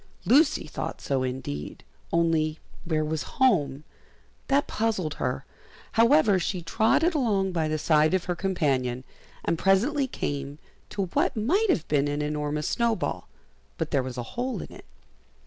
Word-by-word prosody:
Lucy 300 +4 +4
thought - - -5
so 135 -2 -1
indeed; 125 - -5 0.3
only 165 -2 +1 0.3
where 155 -2 0
was 155 0 -2 0.2
home? 150 - +2 0.6
that 280 +1 +3
puzzled 210 -9 -1
her. 130 -1 -3 0.5
However, 230 -4 +4
she 180 0 -2
trotted 225 - +2
along 205 -10 +1
by 165 -3 0
the 155 0 -1
side 155 +2 +3
of 185 - 0
her 180 - -1
companion, 135 -10 0 0.4
and 165 - 0
presently 260 +9 +2
came 140 - -4 0.3
to 200 - -2
what - - +1
might 370 - +2
have 165 - +1
been 145 -1 +2
an 145 +1 -1
enormous 150 0 -2
snowball, 235 -2 -1 0.5
but 160 -1 -3
there 140 - +2
was 130 -1 -6
a 120 - -2
hole 245 -3 -2
in - - -11
it. - - -13
165 Hz, 150 wpm, -26 LUFS, 145-225 Hz, 0.6 s, Lucy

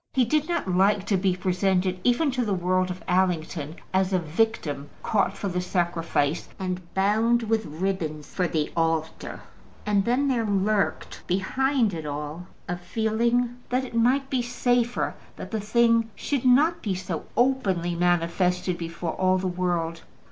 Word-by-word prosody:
He 255 -2 +3
did 305 +6 +1
not 340 - -1
like 195 +2 +3
to 200 - +1
be 185 -1 +1
presented, 185 0 0
even 270 +5 +3
to 255 -1 0
the 205 -4 0
world 185 +1 +1
of 180 0 -6
Allington, 170 -4 0 0.2
as 190 0 +2
a 185 - +3
victim 160 -4 -1
caught 200 -2 +1
for 200 - -3
the 180 -1 -1
sacrifice, 170 -4 0
and 185 -1 -3
bound 220 +5 +3
with 220 -1 0
ribbon 160 -2 -2
for 180 +4 -2
the 155 -3 -1
altar. 165 -1 -1 0.4
And 205 -2 +2
then 250 +6 +1
there 250 -4 +1
lurked 205 0 0
behind 230 +5 +1
it 160 -2 -5
all 150 +4 -5 0.2
a 175 - -2
feeling 235 +5 0
that 255 +2 0
it 245 - -10
might 255 +4 +2
be 265 -3 0
safer 245 0 0 0.2
that - - -8
the 220 -2 -1
thing 230 +1 +3
should 275 -3 -2
not 295 +7 +4
be 200 -4 -1
so 180 -3 -4
openly 200 -10 +2
manifested 175 +1 +1
before 165 0 -4
all 185 0 +2
the 185 0 -2
world. 175 -2 -1
190 Hz, 160 wpm, -25 LUFS, 175-235 Hz, 0.4 s, not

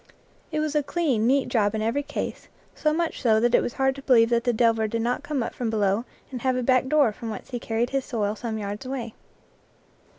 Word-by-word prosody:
It 310 - -1
was 305 -1 -1
a 300 - +3
clean, 275 -8 0
neat 275 +1 +3
job 210 -2 +1
in 215 - -1
every 230 +6 0
case, 290 +1 -5 0.3
so 305 - 0
much 330 +1 -1
so 220 -4 +4
that 240 +1 +2
it - - +5
was - - -3
hard 265 0 +1
to 275 - -10
believe 240 -4 +4
that 235 0 +2
the 245 - +3
delver 225 -1 +2
did 230 +1 -2
not 245 +1 0
come 285 -5 -2
up - - -5
from 240 -2 -3
below 210 +1 +1 0.3
and 250 -2 -5
have 260 0 +1
a 250 - -1
back 255 +1 +3
door 285 -5 +4
from 230 +1 -7
whence 215 +3 -7
he 245 - -3
carried 230 +1 -1
his 270 -1 0
soil 210 -4 -2
some 220 0 -4
yards 205 +2 -5
away. 255 -4 -5
240 Hz, 240 wpm, -25 LUFS, 225-270 Hz, 0.3 s, it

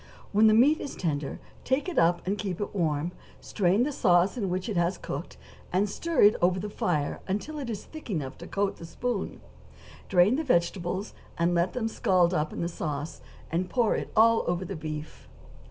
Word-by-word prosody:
When 215 +2 +5
the 215 - +6
meat 285 +7 +5
is 280 - -5
tender, 145 -5 -2 0.2
take 265 +7 0
it 360 - 0
up, 170 +1 +2
and 195 +2 0
keep 195 -3 -4
it 205 - -4
warm; 160 -3 0 0.3
strain 195 +3 +1
the 295 - -1
sauce 180 -6 +3
in 205 -6 -2
which 185 +3 -2
it 215 - -3
has 175 +2 +1
cooked, - - -6 0.3
and 190 +3 +2
stir 335 +11 0
it 205 +1 +7
over 180 +1 +3
the 205 +2 -5
fire 150 -8 -1
until 210 +11 -3
it 265 -4 -5
is 215 -4 -4
thick 310 -5 -11
enough 150 -9 -3
to - - -8
coat 200 0 -1
the 165 - -9
spoon; 235 +3 -3 0.7
drain 190 +7 +4
the 320 - -1
vegetables, 185 - 0 0.2
and 170 +1 +2
let 170 +1 +1
them 245 -3 -1
scald 185 -5 +2
up 155 -2 0
in - - -5
the 170 - 0
sauce, 150 -2 -4 0.3
and 180 +3 -1
pour 240 -4 +2 0.2
all 230 +1 +5
over 175 +2 -1
the 195 - -5
beef. 155 -1 -7
185 Hz, 200 wpm, -28 LUFS, 170-220 Hz, 0.7 s, it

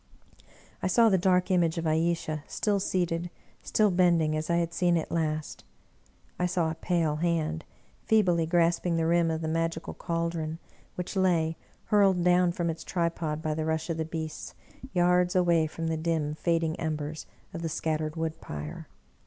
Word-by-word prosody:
I - - 0
saw 230 +5 +5
the 190 - +4
dark 180 +1 +2
image 170 -2 +2
of 165 - -2
Ayesha 160 -1 0
still 205 -2 0
seated, 175 -2 -1 0.3
still 215 -2 +2
bend 175 -1 +4
ing, 155 -1 0
as 155 +1 -3
I 170 - +3
had 170 -1 0
seen 175 -2 +2
it 160 - -3
last. 155 -2 -2 0.8
I 180 - +2
saw 170 -3 0
a - - -3
pale 165 -3 0
hand 160 -1 -1 0.4
feebly 180 -7 +3
grasp 170 0 +2
ing 170 -1 +1
the 165 - +1
rim 170 0 +3
of 160 0 -2
the 160 - -2
magical 165 0 -2
caldron, 165 -2 -3 0.4
which 180 +2 -5
lay, 170 -4 +2 0.3
hurled 195 -4 +3
down 180 0 +4
from 170 0 -2
its 160 - -8
tripod 165 -3 -2
by 155 - 0
the 155 +1 -2
rush 160 +1 -1
of 165 - -3
the 160 - 0
beasts, 160 -1 -6 0.4
yards 180 0 +3
away 170 -3 +3
from 165 +1 -6
the 160 0 -1
dim, 160 -2 -1
fading 165 0 0
embers 155 -1 -4 0.3
of 165 - -5
the 165 - -2
scattered 155 0 -2
wood 160 -1 -3
pyre. 75 0 -7
165 Hz, 180 wpm, -28 LUFS, 160-175 Hz, 0.8 s, saw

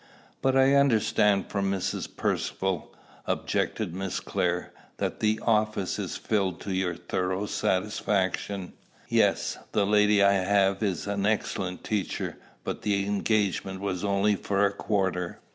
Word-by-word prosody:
"But 135 0 +3
I 135 +1 +5
understand 110 -7 +3
from 100 -1 0
Mrs. 95 -2 -2
Percivale," 95 -3 -1 0.4
objected - - -1
Miss 95 0 -3
Clare, 90 0 -1 0.2
"that - - -2
the 110 0 +1
office 110 -4 +1
is - - -3
filled 95 -5 0
to 100 - -3
your 95 -2 0
thorough 95 +3 -2
satisfaction." 95 -1 -1 0.4
"Yes; - - +2
the 100 - +3
lady 105 0 +4
I 100 - +6
have 95 0 +2
is 95 -6 -1
an 100 0 0
excellent 95 -4 -1
teacher; 105 -3 -2 0.3
but - - -4
the 100 -2 +1
engagement 100 -2 0
was 95 -2 -3
only 100 +1 +2
for 100 +1 +1
a 100 - +1
quarter." 95 -4 -1
100 Hz, 135 wpm, -27 LUFS, 95-105 Hz, 0.4 s, I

